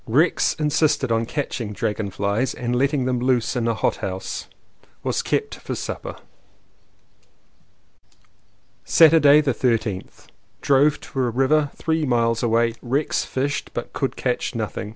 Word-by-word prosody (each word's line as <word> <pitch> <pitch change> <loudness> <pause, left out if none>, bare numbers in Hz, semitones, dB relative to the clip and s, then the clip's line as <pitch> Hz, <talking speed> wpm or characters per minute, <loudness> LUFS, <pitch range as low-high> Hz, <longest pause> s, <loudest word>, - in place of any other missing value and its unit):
Rex 150 +10 +2
insisted 150 -4 +1
on 115 0 +1
catching 120 -7 -3
dragon 105 +1 -2
flies 100 +6 -1
and 125 0 -2
letting 135 +1 +1
them 125 -1 0
loose 125 0 +1
in 120 -2 0
a 115 - +1
hot - - 0
house. 95 0 -5 0.6
Was - - 0
kept - - -1
for - - -6
supper. - - -5 2.7
Saturday 155 -2 +6
the 140 -4 0
13th. 115 -6 -2 0.3
Drove 145 +2 +3
to 135 - -7
a 125 -2 +1
river 135 +5 +2
three 160 -1 -1
miles 115 -4 +1
away. 115 0 +2
Rex 135 +5 -1
fished, 140 +2 -2
but - - -5
could - - -2
catch - - -2
nothing. 105 - -4
125 Hz, 135 wpm, -22 LUFS, 115-145 Hz, 2.7 s, Saturday